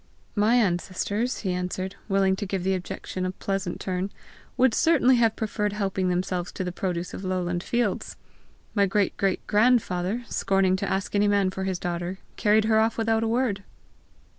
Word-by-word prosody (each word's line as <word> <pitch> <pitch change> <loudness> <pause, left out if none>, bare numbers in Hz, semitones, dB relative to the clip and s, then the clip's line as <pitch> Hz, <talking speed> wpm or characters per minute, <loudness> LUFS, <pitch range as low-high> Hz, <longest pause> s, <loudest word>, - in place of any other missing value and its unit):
"My 215 +3 +3
ancestors," 205 +3 0
he 190 - -1
answered, 185 +1 -3
willing 195 -1 +3
to 205 - -3
give 190 -2 -2
the 190 +1 +1
objection 185 0 -4
a 185 - 0
pleasant 190 -1 -3
turn, 185 +1 -2 0.5
"would 255 -2 +4
certainly 260 -5 +4
have 230 -2 +3
preferred 210 -2 -2
helping 195 -3 -1
themselves 180 0 -1
to 190 - -3
the 180 - -3
produce 180 -1 -3
of - - -6
lowland 180 -2 -1
fields! 235 0 -1 0.6
My 200 -2 +3
great 200 +1 +1
great 195 -2 0
grandfather, 210 -2 +2
scorning 195 -2 +2
to - - -2
ask 190 0 -2
any 205 0 +3
man 200 -2 +2
for 190 0 -4
his 190 -1 -1
daughter, 175 +1 -3 0.2
carried 210 0 +3
her 220 0 +4
off 225 +1 +1
without 225 0 +1
a 225 - 0
word!" 225 -4 0
195 Hz, 175 wpm, -26 LUFS, 185-220 Hz, 0.6 s, would